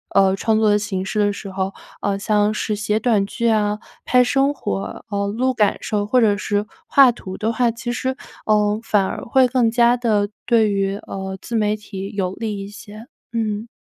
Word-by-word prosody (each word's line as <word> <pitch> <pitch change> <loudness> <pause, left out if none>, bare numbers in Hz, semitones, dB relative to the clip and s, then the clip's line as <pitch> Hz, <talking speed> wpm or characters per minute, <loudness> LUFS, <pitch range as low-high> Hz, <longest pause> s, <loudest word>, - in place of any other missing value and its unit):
嗯 195 -1 +5
创 220 +2 +1
作 215 -1 +3
的 205 - +3
形 200 -2 -3
式 210 - -2
的 205 0 +3
时 200 -1 -8
候， 190 +1 -2 0.3
呃 200 -1 0
像 210 +1 +1
是 215 0 -2
写 210 +1 0
短 220 -4 +2
剧 235 +2 -2
啊， 210 -1 +1 0.3
拍 250 0 +5
生 275 +3 +2
活 205 -7 -5
呃 200 -1 -1
录 250 +6 0
感 210 -4 +2
受 205 -1 -1
或 250 +3 +3
者 205 -2 +3
是 205 0 -1 0.2
画 270 -3 +6
图 190 -5 -8
的 220 +1 0
话， 240 +1 +2
其 235 +1 -4
实， 260 +2 -1 0.4
嗯 210 0 +2
反 205 -3 +2
而 - - -4
会 255 +2 +4
更 245 -2 +2
加 235 +1 +4
地 215 -4 +1 0.2
对 225 -3 +4
于 195 0 0
嗯 190 0 -5
自 235 - -5
媒 210 -1 +2
体 200 -1 -7
有 190 -2 -1
利 215 -2 -4
一 - - -8
些， 215 +2 -11 0.3
嗯。 220 -1 -2
210 Hz, 215 characters per minute, -21 LUFS, 200-230 Hz, 0.4 s, 画